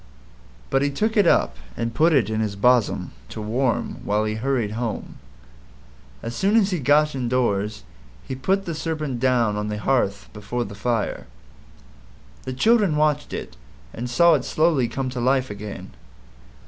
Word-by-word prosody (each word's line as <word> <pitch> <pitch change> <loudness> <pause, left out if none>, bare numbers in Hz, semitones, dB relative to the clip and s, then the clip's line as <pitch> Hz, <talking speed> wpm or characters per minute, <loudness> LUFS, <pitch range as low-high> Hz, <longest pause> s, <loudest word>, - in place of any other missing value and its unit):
But 135 - +3
he 140 - +2
took 215 +11 -1
it 205 - +4
up 65 - +3 0.2
and 115 0 -2
put 160 +7 +4
it 135 -9 +3
in 110 0 -2
his 105 -2 -2
bosom 120 +1 +2 0.2
to - - -7
warm 115 +4 -1
while 105 +1 +1
he 105 - -1
hurried 115 -1 -1
home. 115 0 -4 1.0
As 115 - -5
soon 200 - +2
as 205 -3 +4
he 180 - -1
got 150 +2 +3
indoors 115 - -1 0.4
he - - -4
put 190 +10 0
the 170 - -3
Serpent 155 -5 -3
down 120 -4 +2
on 105 0 -2
the 105 0 -3
hearth 105 -4 0
before 110 +4 -3
the 100 - -8
fire. 110 - -2 1.2
The 130 - -3
children 205 - +3
watched 150 -1 +1
it 60 - -6 0.4
and 120 +2 -5
saw 170 +7 +5
it 140 -5 +1
slowly 155 -6 +2
come 130 +2 -3
to 125 - -4
life 130 0 +1
again. 100 -2 -8
125 Hz, 165 wpm, -23 LUFS, 110-150 Hz, 1.2 s, saw